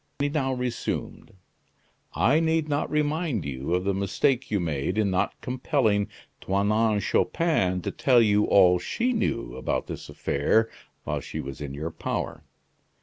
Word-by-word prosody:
He 145 0 0
now 140 -3 0
resumed: 125 -5 -4 0.8
"I 140 +7 +4
need 160 -1 +1
not 145 0 -1
remind 150 - 0
you 70 +4 -2
of 90 - 0
the 100 +1 +1
mistake 100 +7 0
you 105 - +1
made 80 +2 -2
in 105 -3 +2
not 95 +2 -1
compelling 125 -5 +1 0.3
Toinon 105 +2 +2
Chupin 100 - +1
to - - -2
tell 125 -3 +4
you 105 -2 +4
all 90 -2 +5
she 245 - -1
knew - - -1
about 65 - -2
this - - -7
affair 110 +11 +1 0.3
while - - -2
she - - -6
was 70 +2 -6
in 70 -1 -5
your 80 +3 -4
power. - - -4
105 Hz, 150 wpm, -26 LUFS, 90-140 Hz, 0.8 s, all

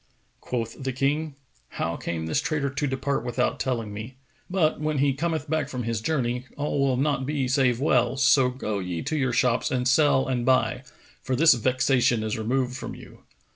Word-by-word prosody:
Quoth 115 0 -4
the 135 - -1
King, 140 +3 -1 0.4
"How - - -1
came 80 -1 -4
this 80 - 0
traitor 150 -4 -1
to 145 +1 -1
depart 135 +1 -1
without 120 -1 -1
telling 115 -5 -2
me? 110 +5 -8 0.3
But, 175 -4 +1
when 155 -1 -1
he 140 0 +2
cometh 160 +1 -2
back 155 -2 -1
from 125 -4 -4
his 115 -1 -2
journey, 125 -3 -1
all 145 0 -1
will 135 -2 +2
not 140 0 0
be 140 -3 -1
save 130 -2 +2
well[FN#458]: 125 -2 +2
so 135 -1 +5
go 110 -5 -3
ye 90 -3 -4
to 155 - -2
your 135 -4 +1
shops 120 0 +1
and 125 -1 0
sell 135 0 +3
and 125 -2 -1
buy, 130 0 +2 0.4
for 130 - -2
this 155 +3 +6
vexation 125 -1 +2
is 110 -1 -2
removed 125 +3 -1
from - - -6
you." - - -14
130 Hz, 190 wpm, -25 LUFS, 120-140 Hz, 0.4 s, this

